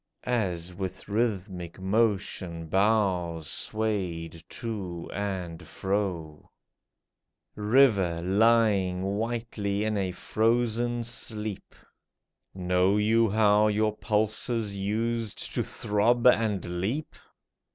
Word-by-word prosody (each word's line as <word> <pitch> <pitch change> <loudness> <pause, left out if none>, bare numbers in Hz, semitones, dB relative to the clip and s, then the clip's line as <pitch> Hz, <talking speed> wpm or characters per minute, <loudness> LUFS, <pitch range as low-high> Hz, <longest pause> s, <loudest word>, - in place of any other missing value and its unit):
As 90 -8 -1
with 95 0 -6
rhythmic 100 -6 -2
motion 95 -4 0
boughs 90 -4 +1
swayed 90 -7 -2
to 95 -8 -5
and 90 -5 -4
fro? 90 -6 -3 1.1
River, 105 -6 +3
lying 100 -2 +3
whitely 105 0 -2
in 110 -1 0
a 95 -1 -1
frozen 120 +4 0
sleep. 110 -3 -4 0.8
Know 90 +2 +2
you 110 +2 +3
how 105 0 +4
your 105 0 +1
pulses 110 0 -1
used 110 +2 -2
to - - 0
throb 115 +4 +1
and 105 -8 +2
leap 130 +11 -2
105 Hz, 90 wpm, -27 LUFS, 90-110 Hz, 1.1 s, how